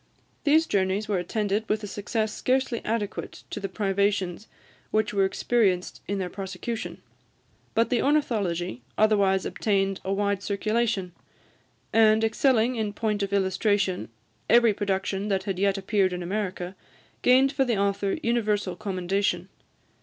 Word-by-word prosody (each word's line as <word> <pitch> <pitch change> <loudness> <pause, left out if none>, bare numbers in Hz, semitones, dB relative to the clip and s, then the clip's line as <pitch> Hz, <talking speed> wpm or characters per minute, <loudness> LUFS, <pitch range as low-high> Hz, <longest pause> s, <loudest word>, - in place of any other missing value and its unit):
These 310 +3 +5
journeys 195 -2 0
were 200 -3 0
attended 210 +3 -1
with 215 0 0
a - - -2
success 215 +2 -2
scarcely 260 -2 0
adequate 215 -2 -3
to - - -4
the 195 -1 -4
privations 200 -1 0 0.4
which 215 -1 0
were 195 -1 +3
experienced 190 -3 0
in 200 - -1
their 185 -2 -2
prosecution; 195 +5 -5 0.7
but 230 +3 +2
the 245 - +2
"Ornithology" 200 - 0 0.2
otherwise 200 -3 +3
obtained 195 -2 0
a 190 - -2
wide 200 0 0
circulation, 210 -1 -1 0.8
and, 220 0 +5
excelling 235 +1 +2
in 215 -2 -2
point 210 -1 -1
of 200 0 -2
illustration 195 - +1 0.4
every 235 -1 +6
production 195 0 -1
that 195 -2 0
had 190 -2 -3
yet 200 0 +2
appeared 195 -1 +1
in 180 0 -4
America, 185 -1 -3 0.5
gained 260 +2 +5
for 275 -2 +1
the 240 -5 0
author 200 0 0
universal 210 -5 0
commendation. 190 -2 -1
205 Hz, 140 wpm, -26 LUFS, 190-220 Hz, 0.8 s, every